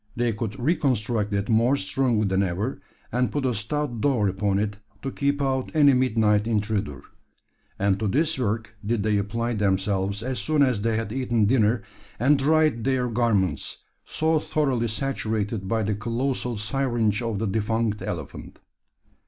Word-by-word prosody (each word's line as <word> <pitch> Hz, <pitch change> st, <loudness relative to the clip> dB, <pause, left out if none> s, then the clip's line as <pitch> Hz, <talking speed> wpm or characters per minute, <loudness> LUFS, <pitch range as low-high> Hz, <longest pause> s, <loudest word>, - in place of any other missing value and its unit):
They 120 Hz, -1 st, +1 dB
could 105 Hz, -1 st, -4 dB
reconstruct 120 Hz, -, 0 dB
it 100 Hz, 0 st, -1 dB
more 115 Hz, +4 st, +3 dB
strongly 110 Hz, +1 st, +1 dB
than 95 Hz, 0 st, +1 dB
ever; 95 Hz, +5 st, -2 dB, 0.3 s
and 125 Hz, +1 st, +1 dB
put 145 Hz, -2 st, -1 dB
a 125 Hz, -, +1 dB
stout 120 Hz, +3 st, -3 dB
door 125 Hz, -8 st, +2 dB
upon 95 Hz, +1 st, 0 dB
it 105 Hz, 0 st, -2 dB, 0.2 s
to 135 Hz, -, -2 dB
keep 140 Hz, +1 st, 0 dB
out 130 Hz, -1 st, 0 dB
any 145 Hz, -3 st, +6 dB
midnight 110 Hz, -4 st, +2 dB
intruder; 105 Hz, -10 st, -1 dB, 0.7 s
and 100 Hz, 0 st, +1 dB
to 110 Hz, -, 0 dB
this 150 Hz, +8 st, +1 dB
work 110 Hz, -2 st, -2 dB
did 105 Hz, 0 st, 0 dB
they 105 Hz, -1 st, +2 dB
apply 115 Hz, +4 st, -1 dB
themselves 100 Hz, 0 st, 0 dB
as 130 Hz, 0 st, -2 dB
soon 155 Hz, -2 st, +2 dB
as 125 Hz, -6 st, +1 dB
they 115 Hz, +1 st, +1 dB
had 115 Hz, -2 st, -3 dB
eaten 120 Hz, -3 st, +1 dB
dinner, 110 Hz, -1 st, +2 dB, 0.4 s
and 135 Hz, +4 st, +4 dB
dried 155 Hz, -4 st, +2 dB
their 130 Hz, -2 st, +1 dB
garments 115 Hz, -5 st, 0 dB, 0.3 s
so 160 Hz, 0 st, +1 dB
thoroughly 135 Hz, -7 st, 0 dB
saturated 110 Hz, -4 st, -2 dB
by 110 Hz, +1 st, 0 dB
the 105 Hz, +1 st, 0 dB
colossal 120 Hz, +3 st, -2 dB
syringe 115 Hz, -1 st, 0 dB
of 115 Hz, -3 st, -2 dB
the 110 Hz, -, -1 dB
defunct 110 Hz, +1 st, -1 dB
elephant. -, -, -6 dB
115 Hz, 160 wpm, -25 LUFS, 105-130 Hz, 0.7 s, any